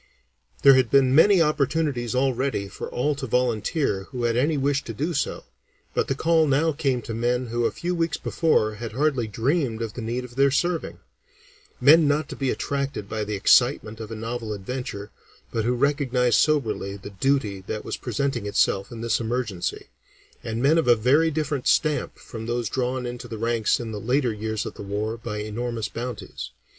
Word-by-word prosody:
There 140 - +9
had 130 -3 +3
been 135 -2 +4
many 175 +4 +6
opportunities 145 -5 0
already 130 -5 0
for - - -7
all 145 +5 0
to 140 -2 -5
volunteer 120 - 0
who 125 +2 -6
had 115 -1 +1
any 145 +5 +2
wish 140 +1 +1
to 115 - -6
do 155 +10 -2
so, 140 - -2 0.5
but - - 0
the 135 - 0
call 160 +2 +3
now 150 +4 +2
came 135 -5 -1
to 115 - -5
men 120 +2 0
who 120 0 +1
a - - +2
few 175 +1 -3
weeks 165 -2 0
before 110 -10 +1
had 110 0 -7
hardly 135 -3 +1
dreamed 120 - 0
of 110 -2 -5
the 125 - -6
need 120 +3 -3
of 120 -1 -13
their 140 0 +5
serving; 165 +5 -1 0.8
men 155 +1 +7
not 145 +1 +1
to - - -6
be 135 -2 -1
attracted 140 -7 -2
by 110 0 -3
the 105 0 -3
excitement 105 +2 +3
of 110 -2 -7
a 115 - -5
novel 115 0 -4
adventure, 105 -1 -6 0.4
but 115 -2 -1
who 125 - +2
recognized 130 -2 +2
soberly 110 -9 0
the 100 +1 -10
duty 100 -3 0
that 105 - -4
was - - -3
presenting 120 -2 -2
itself 100 -1 +1
in 115 -1 -7
this 115 -2 +1
emergency, 115 -5 -3 0.5
and 115 +2 -3
men 155 +4 +5
of 160 - 0
a 120 - +7
very 135 +9 +3
different 150 -3 -2
stamp 155 -2 +1
from 115 -1 -8
those 120 -2 -1
drawn 130 0 -2
into 120 0 -6
the 115 -2 -6
ranks 115 0 +1
in 115 -2 -5
the 105 -1 -5
later 125 0 +1
years 110 0 -3
of - - -5
the - - -10
war 105 +3 -3
by 115 -2 -6
enormous 110 +2 -3
bounties. 120 - -6
125 Hz, 195 wpm, -24 LUFS, 110-140 Hz, 0.8 s, There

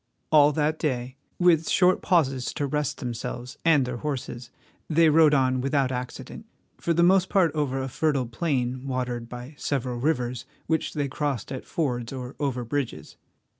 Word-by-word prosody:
All 150 -1 +7
that 155 +1 0
day, 130 -4 -2 0.2
with 170 -3 +3
short 185 0 +4
pauses 135 -8 +1
to 145 - -1
rest 150 0 -1
themselves 120 +1 -5
and 155 -5 +4
their 125 -1 -4
horses, 125 -3 -5 0.4
they 165 0 +5
rode 155 -1 +5
on 130 -1 +2
without 135 0 +1
accident, 130 - -6 0.3
for 170 - -1
the 170 +1 +3
most 190 +1 +4
part 180 -5 +3
over 145 -4 -1
a 130 - -2
fertile 140 -1 0
plain 125 0 -2
watered 125 -3 -3
by 125 +4 -8
several 125 -3 -2
rivers 125 -4 -1 0.2
which 160 0 -1
they 145 -2 0
crossed 140 -4 -3
at 130 - -5
fords 125 -9 -2
or 130 -1 -6
over 130 -4 -1
bridges. 140 +1 -4
135 Hz, 165 wpm, -26 LUFS, 125-155 Hz, 0.4 s, All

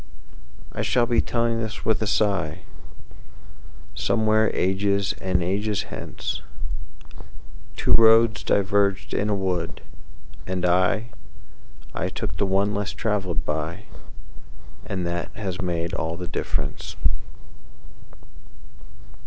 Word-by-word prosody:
I - - -3
shall 120 -1 +3
be 120 -1 +3
telling 115 -1 0
this 110 -1 -5
with 110 - +2
a 110 - 0 1.9
sighSomewhere 110 -1 +3
ages 100 +2 +1
and 90 -2 +1
ages 100 +3 0
hence:Two - - -6
roads 115 0 +6
diverged 100 0 +2
in 105 - +1
a 105 - +2
wood, 90 -4 -2 0.6
and 90 -1 -1
I—I 60 - -2
took - - -4
the 100 - +1
one 100 +2 +2
less 105 0 -2
traveled 95 -7 -1
by, 80 +6 -2 1.0
And 90 -2 -2
that 85 0 -2
has 95 -3 -3
made 85 -2 -1
all 80 +1 -2
the 90 0 -5
difference. - - -3
95 Hz, 100 wpm, -25 LUFS, 85-105 Hz, 1.9 s, roads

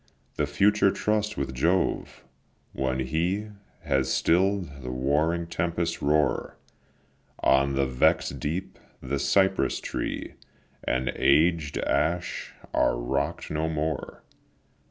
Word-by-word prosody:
The 75 - 0
future 100 +7 +3
trust 105 +1 -1
with 65 -1 -2
Jove; 85 +8 0 0.5
when 65 -1 -1
He 85 +10 -1 0.3
Has 65 -1 +1
still'd 90 -5 +1
the 65 - -6
warring 75 +7 +1
tempests' 85 0 -2
roar 75 +1 +1 0.9
On 70 +1 +3
the 70 0 +2
vex'd 65 -1 +1
deep, 85 +6 -4 0.2
the 70 +2 -3
cypress 95 +6 +2
tree - - -4 0.5
And 65 +1 0
aged 80 +1 +3
ash 85 +3 -1 0.2
are - - +2
rock'd 70 +6 -2
no 80 +1 -1
more. 80 0 -3
75 Hz, 110 wpm, -26 LUFS, 70-85 Hz, 0.9 s, future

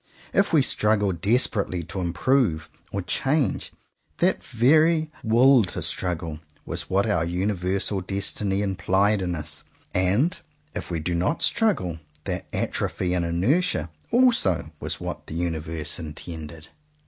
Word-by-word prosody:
If 195 - +3
we 155 -5 +5
struggle 105 -4 +3
desperately 100 -1 +1
to 95 +4 -4
"improve" 85 - +1 0.2
or 100 -1 -3
change; 135 - 0 0.5
that - - +1
very 155 +6 +3
"will 120 +2 +5
to - - -5
struggle" 85 -4 -3 0.3
was - - -5
what 100 +2 +2
the 105 -7 +1
universal 95 +1 -1
destiny 100 +1 -1
implied 95 +2 +1
in 90 -2 -1
us; 75 -2 -4 0.3
and 100 - +2 0.4
if - - -5
we 85 - -2
do 85 +3 -2
not 90 - 0
struggle, 190 - +2 0.2
that - - -4
atrophy 90 -1 -1
and 90 -1 +1
inertia 85 - +1 0.2
also 100 - +3
was - - -4
what - - -6
the - - -6
universe 80 -2 -3
intended. 80 0 -8
95 Hz, 130 wpm, -25 LUFS, 85-120 Hz, 0.5 s, we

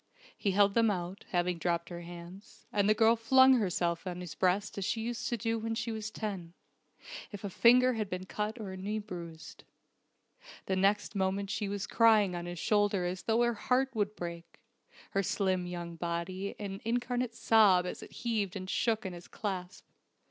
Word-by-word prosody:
He 205 - -1
held 200 +1 +4
them 230 0 +4
out, 180 -1 -4
having 175 -1 0
dropped 170 0 -1
her 175 -1 -6
hands, 175 +3 -11
and 205 0 +2
the 215 - +5
girl 225 +1 +5
flung 260 +3 +6
herself 175 -3 -1
on 180 -1 -4
his 175 -4 -6
breast 185 +5 +1
as - - -2
she 225 - -1
used 235 +3 -3
to 240 - -1
do 225 +1 -1
when 225 +1 -2
she 230 - -2
was 220 -1 -4
ten, 195 -6 -5 0.8
if 205 -1 -8
a 200 - -4
finger 250 +5 +5
had 215 -3 -3
been 185 0 -4
cut 210 +4 -3
or 205 -3 -5
a 190 - -7
knee 205 +3 -3
bruised. 170 -6 -8 1.0
The 190 - 0
next 200 +3 +2
moment 195 +1 0
she 205 -1 -2
was 200 -1 -3
crying 215 -5 +4
on 175 0 -5
his 175 0 -5
shoulder 205 -1 +2
as 180 0 -3
though 225 +4 +2
her 240 0 +2
heart 260 +4 +1
would 210 -1 0
break, 170 -1 -7 0.5
her 195 - +1
slim 185 -2 0
young 170 -1 -6
body 175 +3 -3
an 195 -2 -5
incarnate 245 +1 -1
sob 210 -6 +5
as 180 - -5
it - - -11
heaved 215 -5 -2
and 185 -1 -5
shook 220 +2 0
in 190 - -4
his 175 0 -10
clasp. 190 -3 -5
200 Hz, 190 wpm, -31 LUFS, 180-220 Hz, 1.0 s, flung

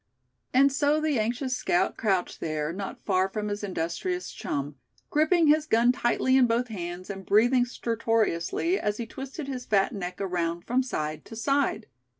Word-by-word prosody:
And 275 +2 +5
so 290 +2 +2
the 305 -5 +1
anxious 245 +4 -1
scout 175 - +1
crouched 195 -5 0
there, 155 0 -2
not 195 +1 -6
far 190 -1 +2
from 210 +1 -3
his 205 0 -4
industrious 200 - -3
chum, 140 0 -4 0.3
gripping 315 +3 +3
his 305 +1 +4
gun 235 -1 +4
tightly 255 +1 +2
in 255 -2 +5
both 235 +2 0
hands, 180 -2 -5
and 195 -1 -7
breathing 245 +6 +4
stertorously 230 - 0
as 210 0 -1
he 235 - -3
twisted 270 +5 -7
his 255 -2 -5
fat 200 +1 +2
neck 180 -3 -5
around 175 -3 -2
from 250 +2 +2
side 155 -12 -3
to 225 - -10
side. 275 -2 0
225 Hz, 165 wpm, -27 LUFS, 185-265 Hz, 0.3 s, And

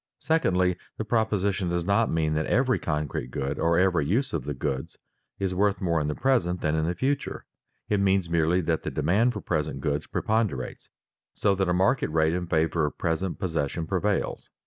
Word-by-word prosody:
Secondly, 90 - +1 0.2
the 110 - -3
proposition 100 -5 0
does 85 -1 -1
not 100 +4 +2
mean 80 -1 +1
that 75 0 0
every 130 -2 +2
concrete 75 -6 -2
good, 70 +2 -3
or 85 0 +2
every 90 -4 +3
use 120 - 0
of - - -2
the 75 - -2
goods, 65 +1 -3 0.4
is 95 -2 -1
worth 100 +2 +1
more 85 -5 +1
in 75 - -1
the 75 - -2
present 115 -10 +1
than 75 -1 0
in 80 0 +1
the 85 - -1
future; 140 +5 -2 0.4
it 105 - +1
means 95 -2 +2
merely 85 +2 +2
that 80 -1 0
the - - -3
demand 105 - +2
for - - -6
present 75 -3 -2
goods 75 +1 -2
preponderates 110 - -2 0.5
so 100 - +2
that 95 -1 0
a - - +2
market 95 +3 +2
rate 80 0 +2
in 90 0 -2
favor 80 -1 +1
of 75 - -7
present 85 +3 -1
possession 80 -2 -2
prevails. 95 +3 -1
90 Hz, 190 wpm, -26 LUFS, 80-100 Hz, 0.5 s, every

